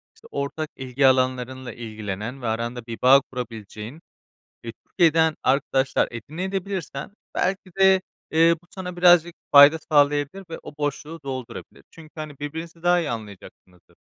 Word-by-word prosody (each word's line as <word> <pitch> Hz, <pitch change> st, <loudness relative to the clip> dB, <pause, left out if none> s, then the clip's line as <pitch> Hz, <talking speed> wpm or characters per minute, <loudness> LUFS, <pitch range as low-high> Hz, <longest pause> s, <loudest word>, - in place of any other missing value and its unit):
işte -, -, -18 dB
ortak 140 Hz, +2 st, -3 dB
ilgi 130 Hz, +1 st, +1 dB
alanlarınla 130 Hz, -1 st, 0 dB
ilgilenen 110 Hz, +2 st, -6 dB
ve 120 Hz, -, -3 dB
aranda 115 Hz, +2 st, -3 dB
bir 115 Hz, -1 st, -6 dB
bağ 135 Hz, +2 st, +7 dB
kurabileceğin 115 Hz, +2 st, -7 dB, 0.6 s
ve 115 Hz, -, -4 dB
Türkiye'den 160 Hz, -2 st, +3 dB
arkadaşlar 135 Hz, -1 st, +1 dB
edinebilirsen 175 Hz, -, -5 dB
de -, -, -32 dB, 0.2 s
belki 190 Hz, 0 st, -1 dB
de, 190 Hz, -1 st, +6 dB, 0.3 s
ııı, 165 Hz, +1 st, +5 dB
bu -, -, -25 dB
sana 180 Hz, -2 st, -7 dB
birazcık 175 Hz, -1 st, +5 dB, 0.2 s
fayda 145 Hz, +2 st, +9 dB
sağlayabilir 145 Hz, +5 st, +2 dB
ve 165 Hz, -, -6 dB
o 145 Hz, -, -10 dB
boşluğu 150 Hz, +2 st, -4 dB
doldurabilir. 130 Hz, -3 st, -7 dB
Çünkü, 160 Hz, -2 st, -15 dB
hani, 155 Hz, -3 st, -8 dB
birbirinizi 160 Hz, +3 st, -7 dB
daha 175 Hz, 0 st, +4 dB
iyi 160 Hz, -, -2 dB
anlayacaksınızdır. 100 Hz, -5 st, -10 dB
145 Hz, 140 wpm, -24 LUFS, 125-165 Hz, 0.6 s, fayda